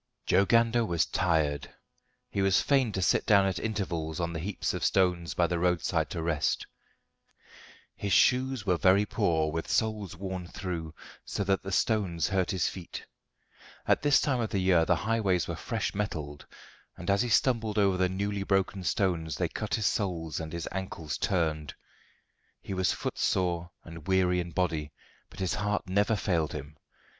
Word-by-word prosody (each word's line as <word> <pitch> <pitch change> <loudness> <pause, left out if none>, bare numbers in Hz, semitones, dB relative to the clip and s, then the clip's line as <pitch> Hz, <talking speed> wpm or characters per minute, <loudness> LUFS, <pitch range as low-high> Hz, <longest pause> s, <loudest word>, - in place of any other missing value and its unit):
Joe 100 - +4
Gander 115 +2 +3
was 85 -6 +1
tired. 80 -6 0 0.6
He 100 - -1
was 95 -1 +4
fain 135 -5 +2
to 95 - -1
sit - - +3
down 100 -2 +6
at 95 -2 -1
intervals 85 -8 -3
on 85 0 -2
the 80 - -3
heaps 95 +5 -2
of - - -4
stones 90 -3 +1
by 85 - +3
the 85 0 -1
roadside 90 -1 +1
to 80 - -4
rest. 80 -3 0 1.3
His 100 - -4
shoes 125 +3 +3
were 90 -3 +2
very 95 +4 +4
poor, 85 -8 +1
with 80 +1 -3
soles 105 -4 -1
worn 95 -1 -5
through, 85 -4 -5 0.3
so 100 - -3
that 95 0 +1
the 95 - -6
stones 95 -5 +1
hurt 95 -2 +1
his 95 -3 +1
feet. 90 -3 -7 0.8
At - - +3
this 145 -1 +4
time 135 -4 0
of 115 -2 -1
the - - -1
year 90 -3 +3
the - - +3
highways 100 -5 0
were 85 - -3
fresh 110 +5 -3
metalled, 80 -8 -4 0.5
and 90 -1 -8
as 100 - +3
he 120 - -1
stumbled 115 -3 +2
over 100 -2 +3
the 90 0 +2
newly 100 +2 -2
broken 95 -1 0
stones 85 -6 0
they - - 0
cut - - -2
his 110 - -2
soles 85 - -1
and 80 -1 -6
his 85 -2 -4
ankles 85 -5 -4
turned. 80 -6 -1 0.9
He - - -5
was 95 0 +1
footsore 85 -2 -1
and 85 -1 -11
weary 90 -1 +3
in 85 -1 -3
body, 80 -4 -1 0.4
but 85 - -13
his 95 -3 0
heart 105 0 -1
never 100 +4 +2
failed 90 -5 0
him. 75 0 -7
95 Hz, 175 wpm, -29 LUFS, 85-100 Hz, 1.3 s, down